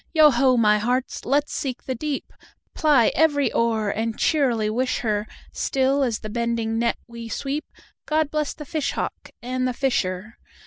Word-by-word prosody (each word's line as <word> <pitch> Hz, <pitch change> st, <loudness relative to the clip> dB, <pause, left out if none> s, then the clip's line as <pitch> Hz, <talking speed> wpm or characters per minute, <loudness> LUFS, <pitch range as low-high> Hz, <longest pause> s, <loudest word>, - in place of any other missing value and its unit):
Yo 310 Hz, -2 st, +7 dB
ho, 255 Hz, 0 st, +3 dB
my 210 Hz, -2 st, +4 dB
hearts! 250 Hz, +4 st, -1 dB
let 285 Hz, +3 st, +2 dB
's -, -, -8 dB
seek 260 Hz, -3 st, -3 dB
the 260 Hz, -, -3 dB
deep, 285 Hz, +3 st, -4 dB, 0.4 s
Ply 290 Hz, -8 st, +4 dB
every 290 Hz, -3 st, +2 dB
oar, 220 Hz, -3 st, +1 dB
and 225 Hz, +2 st, -2 dB
cheerily 250 Hz, -9 st, +2 dB
wish 250 Hz, +4 st, 0 dB
her, 210 Hz, -2 st, -1 dB, 0.2 s
Still 270 Hz, +1 st, +1 dB
as 240 Hz, -5 st, 0 dB
the 215 Hz, -, -5 dB
bending 230 Hz, -1 st, -1 dB
net 235 Hz, 0 st, +1 dB
we 235 Hz, -1 st, -9 dB
sweep,"God 300 Hz, +2 st, -3 dB
bless 305 Hz, -1 st, -1 dB
the 300 Hz, -, -8 dB
fish 305 Hz, 0 st, -2 dB
hawk -, -, -4 dB
and 255 Hz, +1 st, -1 dB
the 250 Hz, -, -1 dB
fisher!" 210 Hz, -6 st, -1 dB
250 Hz, 170 wpm, -23 LUFS, 225-280 Hz, 0.4 s, Yo